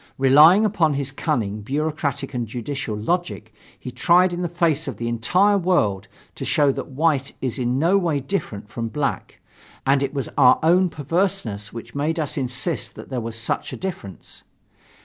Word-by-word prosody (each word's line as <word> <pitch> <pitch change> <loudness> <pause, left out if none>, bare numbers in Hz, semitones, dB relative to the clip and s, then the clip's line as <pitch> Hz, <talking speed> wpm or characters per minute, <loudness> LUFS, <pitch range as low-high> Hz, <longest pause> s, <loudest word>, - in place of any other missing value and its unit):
Relying 150 +10 +6
upon 170 -8 +1
his 140 -1 -2
cunning, 115 -9 -2
bureaucratic 140 +2 -2
and 120 -2 -3
judicial 120 -1 -4
logic, 110 -4 -3 0.3
he 125 - -7
tried 180 +5 +3
in 175 - -3
the 175 - -2
face 165 -3 0
of 130 -7 -5
the 115 - -4
entire 180 - +2
world 105 - +1 0.3
to - - -7
show 145 +2 +3
that - - -5
white 140 -1 0
is 130 0 -3
in 125 +1 0
no 175 +7 +3
way 165 -6 0
different 130 - -4
from 115 +2 -4
black, 140 +5 -3 0.5
and 135 0 +3
it 140 -1 -1
was 140 -3 -3
our 125 -2 +7
own 180 +3 +4
perverseness 145 - -2
which 115 0 -9
made 155 +4 -1
us 150 -3 -2
insist 135 +4 -2
that - - -11
there 130 -3 -3
was 115 0 -6
such 115 - -3
a - - -6
difference. 170 - -7
140 Hz, 175 wpm, -22 LUFS, 120-170 Hz, 0.5 s, our